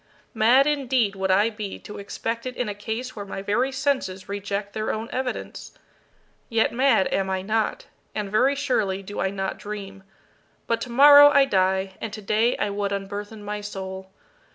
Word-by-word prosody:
Mad 240 Hz, +5 st, +5 dB
indeed 260 Hz, -8 st, +1 dB
would 190 Hz, 0 st, -2 dB
I 205 Hz, +4 st, +3 dB
be 210 Hz, -2 st, -6 dB
to 210 Hz, -, -9 dB
expect 230 Hz, +4 st, -4 dB
it 250 Hz, -, -6 dB
in 250 Hz, -, -1 dB
a 205 Hz, -, -3 dB
case 225 Hz, +5 st, -5 dB
where 205 Hz, -, -5 dB
my 195 Hz, -1 st, -6 dB
very 240 Hz, +7 st, +1 dB
senses 260 Hz, -9 st, -2 dB
reject 200 Hz, 0 st, -4 dB
their 215 Hz, 0 st, -2 dB
own 220 Hz, +1 st, -4 dB
evidence. 255 Hz, -1 st, -5 dB, 0.8 s
Yet 230 Hz, -2 st, +2 dB
mad 255 Hz, -6 st, +3 dB
am 190 Hz, 0 st, 0 dB
I 190 Hz, -1 st, -2 dB
not 220 Hz, +2 st, -1 dB, 0.3 s
and 205 Hz, -2 st, -3 dB
very 255 Hz, +6 st, +3 dB
surely 215 Hz, -9 st, -1 dB
do 205 Hz, +2 st, -7 dB
I 190 Hz, -, +1 dB
not 195 Hz, 0 st, -4 dB
dream. 195 Hz, -2 st, -7 dB, 0.6 s
But 230 Hz, -, -1 dB
tomorrow 285 Hz, +4 st, +8 dB
I 280 Hz, -1 st, +5 dB
die, 190 Hz, -3 st, 0 dB
and 225 Hz, -, -4 dB
today 220 Hz, +3 st, 0 dB
I 205 Hz, -, -1 dB
would 200 Hz, 0 st, -2 dB
unburthen 205 Hz, +2 st, -5 dB
my 210 Hz, 0 st, -4 dB
soul. 190 Hz, -2 st, -7 dB
210 Hz, 175 wpm, -24 LUFS, 195-245 Hz, 0.8 s, tomorrow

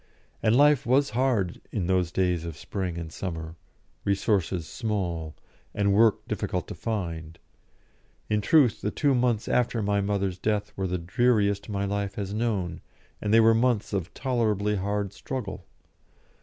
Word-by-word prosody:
And 110 Hz, +1 st, +3 dB
life 145 Hz, 0 st, +5 dB
was 135 Hz, +3 st, +3 dB
hard 115 Hz, -8 st, 0 dB
in 100 Hz, -6 st, -1 dB
those 90 Hz, -2 st, +1 dB
days 90 Hz, -3 st, +1 dB
of 85 Hz, -3 st, -6 dB
spring 90 Hz, -2 st, -4 dB
and 80 Hz, -2 st, -6 dB
summer, 80 Hz, -3 st, -5 dB, 0.5 s
resources 95 Hz, -3 st, 0 dB
small, 90 Hz, -9 st, -3 dB, 0.4 s
and 100 Hz, -1 st, +2 dB
work 110 Hz, 0 st, +3 dB
difficult -, -, -2 dB
to -, -, -4 dB
find. 85 Hz, -7 st, -4 dB, 0.9 s
In 105 Hz, 0 st, +1 dB
truth, 130 Hz, -2 st, +4 dB
the 105 Hz, -, 0 dB
two 140 Hz, +4 st, +1 dB
months 120 Hz, -3 st, +1 dB
after 120 Hz, -2 st, +1 dB
my 100 Hz, 0 st, +1 dB
mother's 100 Hz, -2 st, -1 dB
death 105 Hz, +1 st, -1 dB
were 95 Hz, -1 st, -2 dB
the 90 Hz, 0 st, -1 dB
dreariest 100 Hz, +2 st, +1 dB
my 100 Hz, -1 st, -1 dB
life 100 Hz, 0 st, -2 dB
has 100 Hz, -1 st, -4 dB
known, 105 Hz, -6 st, -1 dB, 0.4 s
and 105 Hz, -, -1 dB
they 115 Hz, -, +7 dB
were 115 Hz, 0 st, +6 dB
months 115 Hz, -2 st, +1 dB
of 95 Hz, -3 st, -2 dB
tolerably 110 Hz, -5 st, 0 dB
hard 100 Hz, +1 st, -2 dB
struggle. 105 Hz, -8 st, -6 dB
100 Hz, 155 wpm, -27 LUFS, 95-115 Hz, 0.9 s, they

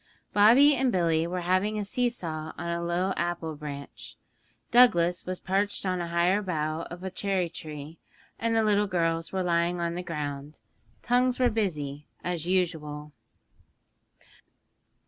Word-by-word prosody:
Bobby 240 Hz, +8 st, +7 dB
and 265 Hz, -2 st, +1 dB
Billy 165 Hz, -3 st, +2 dB
were 180 Hz, +1 st, -3 dB
having 185 Hz, +5 st, +1 dB
a 205 Hz, -, -2 dB
see 245 Hz, +4 st, +1 dB
saw 160 Hz, -8 st, -5 dB
on 170 Hz, -, -4 dB
a 170 Hz, 0 st, -2 dB
low 175 Hz, +3 st, 0 dB
apple 170 Hz, -2 st, -2 dB
branch; 145 Hz, -2 st, -8 dB, 0.6 s
Douglas 180 Hz, -9 st, +4 dB
was 185 Hz, 0 st, -3 dB
perched 200 Hz, +2 st, -1 dB
on 185 Hz, -1 st, 0 dB
a 170 Hz, -, -3 dB
higher 175 Hz, +4 st, +2 dB
bough 160 Hz, -4 st, -2 dB
of 175 Hz, +1 st, -9 dB
a 190 Hz, -, -4 dB
cherry 190 Hz, -2 st, -1 dB
tree, 155 Hz, -1 st, -9 dB, 0.4 s
and 230 Hz, 0 st, 0 dB
the 225 Hz, -, +3 dB
little 210 Hz, -1 st, +3 dB
girls 165 Hz, -2 st, -1 dB
were 190 Hz, -1 st, -1 dB
lying 170 Hz, 0 st, +1 dB
on 170 Hz, 0 st, -1 dB
the 175 Hz, -, -3 dB
ground. 150 Hz, -3 st, -5 dB, 0.5 s
Tongues 250 Hz, +1 st, +2 dB
were 250 Hz, -2 st, +3 dB
busy, 150 Hz, -9 st, -2 dB, 0.2 s
as 175 Hz, -2 st, -3 dB
usual. 155 Hz, -5 st, -1 dB
175 Hz, 150 wpm, -27 LUFS, 165-200 Hz, 0.6 s, Bobby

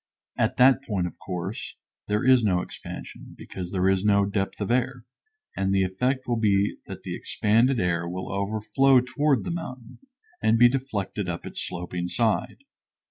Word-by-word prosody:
At -, -, 0 dB
that 130 Hz, +2 st, +5 dB
point, 100 Hz, -9 st, -1 dB
of 90 Hz, -, -7 dB
course, 90 Hz, -2 st, -5 dB, 0.3 s
there 105 Hz, +2 st, 0 dB
is 130 Hz, -1 st, +6 dB
no 95 Hz, -5 st, +2 dB
expansion, -, -, -9 dB
because 90 Hz, -2 st, -7 dB
there 95 Hz, -1 st, +1 dB
is 95 Hz, 0 st, +2 dB
no 100 Hz, -1 st, +4 dB
depth 100 Hz, -1 st, -2 dB
of 105 Hz, +1 st, -2 dB
air; 125 Hz, 0 st, 0 dB, 0.5 s
and 95 Hz, 0 st, 0 dB
the 95 Hz, -1 st, +3 dB
effect 125 Hz, +8 st, -1 dB
will 120 Hz, -2 st, 0 dB
be 100 Hz, -2 st, +2 dB
that -, -, -8 dB
the -, -, -4 dB
expanded 115 Hz, +4 st, +2 dB
air 85 Hz, -1 st, 0 dB
will 95 Hz, +2 st, -5 dB
overflow 110 Hz, +7 st, +3 dB
toward 140 Hz, +2 st, +1 dB
the -, -, -4 dB
mountain, 130 Hz, -8 st, -7 dB, 0.4 s
and 110 Hz, -, +3 dB
be 120 Hz, +1 st, +7 dB
deflected 105 Hz, -7 st, -3 dB
up 85 Hz, -, -5 dB
its -, -, -6 dB
sloping 90 Hz, 0 st, -4 dB
side. 115 Hz, -, -1 dB
105 Hz, 170 wpm, -25 LUFS, 95-125 Hz, 0.5 s, be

